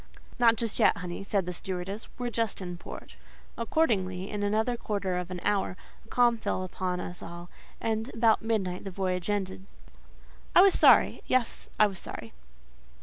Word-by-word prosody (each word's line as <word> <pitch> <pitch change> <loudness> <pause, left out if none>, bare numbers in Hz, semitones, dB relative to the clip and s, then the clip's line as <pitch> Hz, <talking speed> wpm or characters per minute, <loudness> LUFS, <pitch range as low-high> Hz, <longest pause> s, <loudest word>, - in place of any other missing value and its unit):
"Not 230 -1 +6
just 230 -2 -3
yet, - - +5
honey," 180 0 -5
said 195 -2 0
the 180 - -4
stewardess. 190 +4 -5
"We're 245 -1 -3
just 230 -3 -1
in 180 -2 -5
port." - - -9 0.4
Accordingly, 205 - 0
in 210 -1 -3
another 220 +4 +1
quarter 200 -5 -2
of 180 0 -3
an 180 -1 -5
hour, 200 -3 0 0.3
a - - -22
calm 240 -2 +3
fell 185 - -1
upon 180 0 -3
us 180 0 -6
all; 175 +1 -9 0.3
and 220 +3 -1
about 225 -1 +3
midnight 195 -5 -1
the 195 - -5
voyage 185 -1 -2
ended. 190 -2 -2 0.9
I - - +10
was 390 0 +7
sorry: - - +5
yes, 255 -3 0
I 215 - +8
was 195 -3 -3
sorry. - - -8
200 Hz, 170 wpm, -29 LUFS, 180-225 Hz, 0.9 s, I